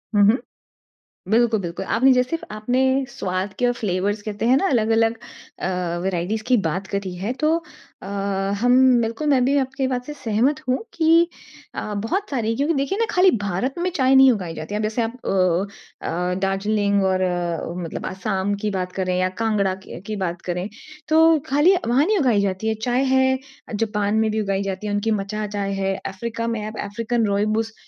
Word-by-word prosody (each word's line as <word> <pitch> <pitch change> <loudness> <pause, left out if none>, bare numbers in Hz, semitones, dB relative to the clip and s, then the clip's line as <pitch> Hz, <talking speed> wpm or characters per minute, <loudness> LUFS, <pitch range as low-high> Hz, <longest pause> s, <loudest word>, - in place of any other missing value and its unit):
हुँ, 205 - +6
हुँ। 225 +5 +5 0.9
बिल्कुल, 225 0 +3
बिल्कुल 175 +1 -5
आपने 255 +6 +4
जैसे 250 +5 +1
इफ़ 330 - -7
आपने 245 +5 0 0.3
स्वाद 190 -5 -3
के 245 -1 +3
फ़्लेवर्स 205 -2 -1
कहते 210 +1 -4
हैं 255 - +5
ना, 390 - +1
अलग-अलग 225 -2 +2 0.4
अ, 180 -2 -2
वेराइटीज़ 190 +4 -1
की 255 - +4
बात 190 +5 -3
करी 200 -2 -3
है, 195 +6 -3
तो 305 +4 0 0.5
अ, - - -9 0.6
हम 245 +1 +5 0.2
बिल्कुल 230 +7 -2
मैं 260 -3 +4
भी 280 +2 +2
आपकी 265 0 -1
बात 250 -1 -2
से 295 - -6
सहमत 260 +2 0
हूँ। 255 - +3 0.2
कि 330 +1 +4 0.5
अ, 210 - -4
बहुत 390 - -1
सारी 230 -4 -1
क्योंकि 290 +5 +1
देखिए 280 +7 -1
ना 460 - +3
खाली 370 0 +5
भारत 200 +8 -1
में 360 +1 0
चाय 265 -1 +4
नहीं 265 -1 +8
उगाई 180 -7 -3
जाती 155 +7 -5
है। 210 - -1
जैसे 215 +3 -1
आप 230 +2 -3
अ 185 +1 -1
अ, 180 +2 -1
दार्जिलिंग 200 +1 +1
और 190 -1 +1
अ, 175 -2 -1
मतलब 165 - -5
असाम 195 +1 -1
की 210 - +1
बात 180 0 -3
करें 185 -1 -1
या 185 0 +1
कांगड़ा 200 -4 +1
की - - -9
की 215 - -3
बात 170 -1 -3
करें। 180 +1 -3 0.4
तो 320 +1 +5
खाली 295 +7 +5
वहाँ 265 +6 +3
नहीं 425 0 +2
उगाई 245 - +3
जाती 195 +2 -1
है। 220 - +2
चाय 245 +2 +2
है 260 0 +3 0.4
जापान 210 -1 0
में 220 0 +2
भी 220 0 0
उगाई 195 -1 -1
जाती 190 +3 -6
है 205 - -2
उनकी 205 +2 0
मचा 210 +2 -4
चाय 200 -1 -3
है। 195 0 0
अफ़्रीका 230 +4 -4
में 230 -2 -2
आप 215 +1 -7
अफ़्रीकन 230 +3 -1
रूइबोस 215 +2 0
215 Hz, 190 wpm, -22 LUFS, 195-255 Hz, 0.9 s, नहीं